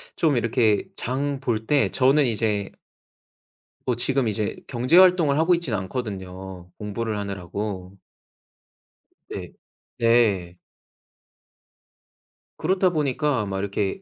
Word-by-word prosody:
좀 150 -6 +2
이렇게 115 -3 +2
장 135 +2 -2
볼 115 -5 -2
때 145 -2 +3
저는 135 +2 +3
이제 105 -4 -1 1.2
뭐 125 - +1
지금 130 +1 +1
이제 105 0 -2
경제 125 +6 +2
활동을 175 -6 +5
하고 175 +2 +4
있진 170 -8 -3
않거든요 95 -4 -5
공부를 105 +1 -3
하느라고. 100 -1 -5 1.3
네. - - -6 0.5
네. 105 -7 +2 2.0
그렇다 185 +2 +2
보니까 145 -5 0
막 95 -1 -3
이렇게 100 - -2
115 Hz, 205 characters per minute, -24 LUFS, 100-140 Hz, 2.0 s, 활동을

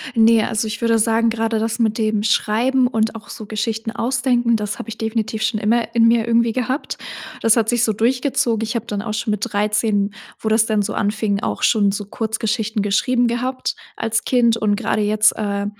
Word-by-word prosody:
Ne, 225 -1 +5
also, 220 0 -1
ich 215 +1 -4
würde 230 -1 +2
sagen, 225 +1 +2
grade 225 0 -1
das 225 +2 -2
mit 220 -2 +1
dem 215 -2 0
Schreiben 230 +4 +2
und 225 -2 0
auch 220 - -10
so 215 - -8
Geschichten 225 +1 -3
ausdenken, 245 -1 +1
das 210 -1 -3
habe 240 - -8
ich 225 - -7
definitiv 220 -1 -2
schon 220 -1 0
immer 230 +2 0
in 230 -1 +5
mir 230 -1 +2
irgendwie 235 0 +3
gehabt. 255 +3 -2 0.4
Das 225 +1 +4
hat 225 -2 +2
sich 240 0 +1
so 220 -3 +2
durchgezogen. 245 +1 0
Ich 225 +2 -3
habe 230 - -2
dann 205 -1 -3
auch 215 0 -4
schon 220 -1 -2
mit 210 - -2
13, 210 0 0 0.3
wo 220 - -2
das 220 0 +3
dann 215 -2 +1
so 205 - -4
anfing, 205 -1 -1
auch - - -3
schon 205 -3 +3
so 205 +1 -4
Kurzgeschichten 220 0 -2
geschrieben 245 +5 +1
gehabt 255 +2 -2 0.2
als 225 -1 -1
Kind, 235 -3 +3
und 210 -2 +1
gerade 215 0 -1
jetzt, 215 +1 +3
äh, 200 -1 -2
225 Hz, 205 wpm, -20 LUFS, 215-235 Hz, 0.4 s, Ne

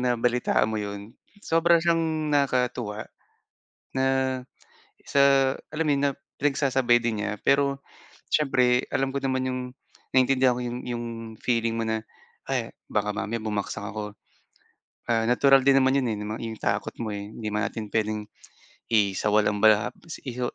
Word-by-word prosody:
nabalitaan 125 -2 +1
mo 110 - -1
yun, 100 +2 -6 0.3
sobra 170 +1 +4
siyang 160 -2 +1
nakakatuwa, 125 -6 0 0.9
na 130 - 0 1.0
sa 135 -1 +4 0.2
alam 160 +1 -2
mo 150 - +2
yun 140 - 0
na - - -2 0.3
pinagsasabay 135 -4 +3
din 115 -3 -2
niya 105 0 -3
pero, 140 0 +3 0.6
siyempre 125 -4 +3
alam 135 0 -1
ko 140 - -2
naman 130 -1 0
yung 130 0 -2 0.5
naiintindihan 130 -1 +4
ko 125 - -3
yung 120 +1 -4
yung 120 -1 -3 0.4
feeling 115 -2 0
mo 115 - -1
na 110 0 -1 0.5
ay - - -2 0.2
baka 105 0 0
mamaya 110 +2 -3
bumagsak 105 -1 -3
ako. 105 0 -5 1.0
Ah, 115 -1 +2
natural 135 +2 +5
din 135 0 +5
naman 130 0 +3
'yon, 130 -3 +1
eh, - - -3
na 105 - -5
mang 110 - -4
'yong 110 -1 -5
takot - - -1
mo, 110 - -3
eh, 100 0 -5
hindi 110 -1 -5
naman 105 +1 0
natin 110 -2 -6
puwedeng 110 -1 -1 0.6
isawalang-bala 105 0 +3 0.3
is 125 -1 -5
120 Hz, 150 wpm, -26 LUFS, 110-135 Hz, 1.0 s, natural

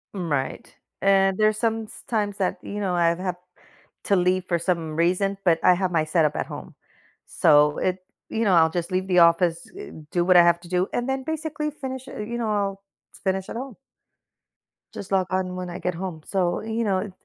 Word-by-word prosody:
M 175 -4 -4
right, 135 -2 -3 0.3
and 195 -1 +3
there's 215 0 +3
sometimes 220 -2 -2
that, 190 -2 -1
you 205 - -6
know, 190 -3 -1
I've 170 -1 +2
had 180 -1 -3 0.7
to 200 - +3
leave 185 0 +1
for 170 -2 0
some 165 -3 -2
reason, 185 +4 +1
but 165 -2 +4
I 180 - +7
have 185 0 -1
my 160 -3 +2
setup 155 -2 +1
at - - -2
home, - - -9 0.5
so, 150 -1 +4
it 185 0 0 0.3
you 225 - -1
know, 195 - +3
I'll 160 -1 +5
just 175 +1 -3
leave 185 +1 -1
the 180 -2 +4
office, 170 0 +4
eh, 410 - -8 0.2
do 175 - +1
what 180 0 +6
I 175 - +9
have 170 0 +4
to 175 - -13
do, 180 +1 +1
and 245 +2 -1
then 265 0 -1
basically 305 -1 -3
finish 265 -3 -7
eh, 260 - -8
you 230 +3 -4
know, 225 -2 -1
I'll 195 -1 -2 0.4
finish 190 -1 -1
at - - -6
home. 260 -1 -6 1.2
Just 200 - -8
log 190 -2 +2
on 185 -1 -1
when 180 -1 -5
I 175 - -6
get 180 -1 -2
home, 175 -3 -5
so, 180 -3 0
you 225 +1 -2
know 195 -1 -1
185 Hz, 205 wpm, -24 LUFS, 175-210 Hz, 1.2 s, I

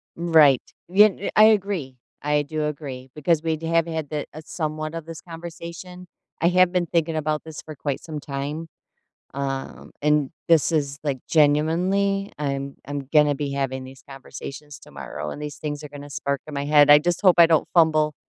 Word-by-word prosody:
Right. 160 -6 +5 0.3
Ye 190 +4 +6
n 200 -1 -1
I 215 - +8
agree, 195 -11 +1 0.3
I 150 0 +1
do 150 +1 -3
agree 140 -4 -6
because 155 +1 +1
we'd 160 -1 -1
have 165 0 +2
had 160 -3 -4
the 150 -2 -3
a 155 - -8
somewhat 155 -1 -4
of 165 -2 -6
this 165 -1 -9
conversation. 170 +1 -9 0.3
I 170 - +4
have 180 0 +4
been 180 -1 +1
thinking 165 0 0
about 155 -1 -1
this 160 -2 -9
for 155 - -10
quite 140 -1 -3
some 155 -3 -6
time, 145 +3 -5 0.7
um, 135 -1 -5
and 150 -2 +2 0.2
this 165 -1 +4
is, 145 -3 -1
like 140 -3 -2
genuinely, 180 +7 +2
I'm 140 -1 -3
I'm 140 -2 -5
gonna 150 -1 +5
be 140 0 -3
having 135 -1 -2
these 130 0 -13
conversations 135 +2 -9
tomorrow, 75 - -7
and 150 - -8
these 150 -2 -6
things 150 -1 -5
are 150 - -8
gonna 145 0 -10
spark 140 0 -3
in 155 - -8
my 140 0 -3
head, 145 0 +5
I 145 0 +9
just 175 +3 -1
hope 185 -4 +6
I 170 - +9
don't 160 -2 +2
fumble, 155 -3 +4
150 Hz, 185 wpm, -23 LUFS, 145-165 Hz, 0.7 s, I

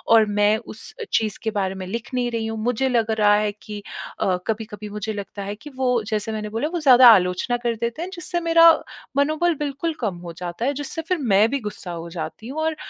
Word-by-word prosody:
और 220 -1 +6
मैं 205 +1 +2
उस 220 -1 -6
अ, - - -2
चीज़ 215 -2 +1
के 220 - -1
बारे 195 -3 -1
में 190 -1 -6
लिख 230 +5 -6
नहीं 245 -1 0
रही 230 -1 -2
हूँ 225 0 -4
मुझे 245 +3 +1
लग 230 -3 +1
रहा 210 -1 +4
है 210 0 +1
कि 210 0 -9 0.4
अ, 185 -1 +1
कभी-कभी 215 -1 -4
मुझे 210 +1 -4
लगता 200 0 -6
है 200 +1 -4
कि 230 +8 -12
वो 250 -2 +1
जैसे 220 0 -2
मैंने 210 -1 -4
बोला, 230 +7 -2
वो 345 +1 -3
ज़्यादा 255 -4 +8
आलोचना 185 +3 +3
कर 240 -1 -1
देते 235 +6 -3
हैं 355 - -4
जिससे 345 -1 -1
मेरा 335 0 +7 0.5
मनोबल 310 +4 +2
बिल्कुल 295 +3 -3
कम 210 -7 -2
हो 175 -1 -8
जाता 175 +6 -5
है, 280 - +1
जिससे 290 +3 -4
फिर 365 0 +1
मैं 215 -6 +3
भी 280 - -1
गुस्सा 210 -5 -6
हो 170 0 -6
जाती 165 +6 -6
हूँ 280 +5 -5
और 320 0 0
225 Hz, 235 wpm, -22 LUFS, 205-265 Hz, 0.5 s, ज़्यादा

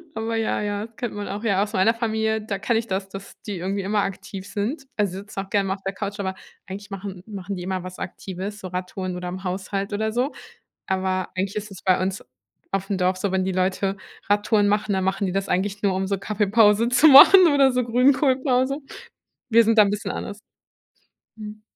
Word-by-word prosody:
Aber 225 +1 -2
ja, 225 -1 0
ja, 205 0 -2
das 230 - -17
kennt 240 -4 -4
man 205 0 -5
auch, 205 +3 -5
ja, 200 -3 +2
aus 210 +1 -6
meiner 220 +4 +3
Familie, 220 -1 -1
da 205 -2 -4
kenne 230 +3 +1
ich 225 - -1
das, 195 0 -3
dass 195 +1 -9 0.2
die 200 - -3
irgendwie 195 +3 -2
immer 205 +2 0
aktiv 195 0 -6
sind, 255 +8 -3
also 195 -3 0
sitzen 205 0 -8
auch 195 - -16
gerne 200 -1 +1
mal 190 - 0
auf 195 - -18
der 195 - -3
Couch, 200 +1 -5
aber 190 -1 -2 0.3
eigentlich 200 +2 -8
machen 195 -2 -7
machen 200 -2 -6
die 180 - -6
immer 185 0 -2
was 185 0 -8
Aktives, 190 +3 -6
so 190 - -7
Radtouren 185 0 -4
oder 180 0 -5
im 185 +1 -7
Haushalt 195 +2 -3
oder 220 +1 -1
so. 250 +5 0 0.6
Aber 185 -1 -1
eigentlich 195 +1 -2
ist 210 0 -4
es 190 - -11
bei 185 -1 +3
uns 190 +1 -2 0.5
aufm 195 0 -1
Dorf 185 0 +1
so, 190 +1 -2
wenn 190 0 0
die 190 - 0
Leute 190 +1 0 0.3
Radtouren 205 0 +2
machen, 210 0 +1
dann 190 -1 0
machen 195 +1 0
die - - -2
das 195 0 -2
eigentlich 195 +3 -1
nur 200 -2 +2
um 190 0 -1
so 200 0 0
Kaffeepause 210 +2 +3
zu 250 +5 +5
machen 335 +6 +10
oder 275 -2 +5
so 250 0 0
Grünkohlpause. 260 +2 +2 0.7
Wir 230 0 +6
sind 225 0 +2
da - - +10
'n 200 - +2
bisschen 205 0 -3
anders. 205 +1 -6 1.0
Mhm. 215 0 -9
200 Hz, 220 wpm, -23 LUFS, 190-220 Hz, 1.0 s, machen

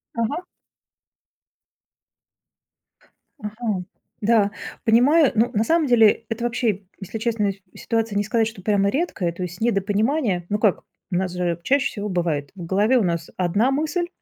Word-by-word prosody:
Мгм. 230 +9 -1 3.0
Мгм, 210 -4 -3 0.4
да, 210 -2 +3 0.3
понимаю. 265 +7 +5
Ну, 230 +3 +2
на 215 - +2
самом 320 +3 +2
деле, 225 -2 +5
это, 225 +1 -3
вообще, 230 -4 0 0.2
если 195 +3 -6
честно, 220 -3 0 0.2
ситуация 225 -2 -2
не 205 - +2
сказать, 225 +2 +1
что 210 -4 -9
прямо 200 0 +2
редкая, 230 - -1
то 175 +2 -6
есть, 180 +3 -7
недопонимание. 210 - +1
Ну 210 0 0
как, 210 -4 +2 0.3
у - - -1
нас 180 0 0
же 175 -2 -1
чаще 275 +4 +2
всего 210 -1 -5
бывает: 165 -6 -1
в 175 -3 -7
голове 205 +8 +3
у 230 - +2
нас 170 -2 -2
одна 200 +8 +2
мысль, 315 +5 -1
215 Hz, 150 wpm, -22 LUFS, 190-240 Hz, 3.0 s, понимаю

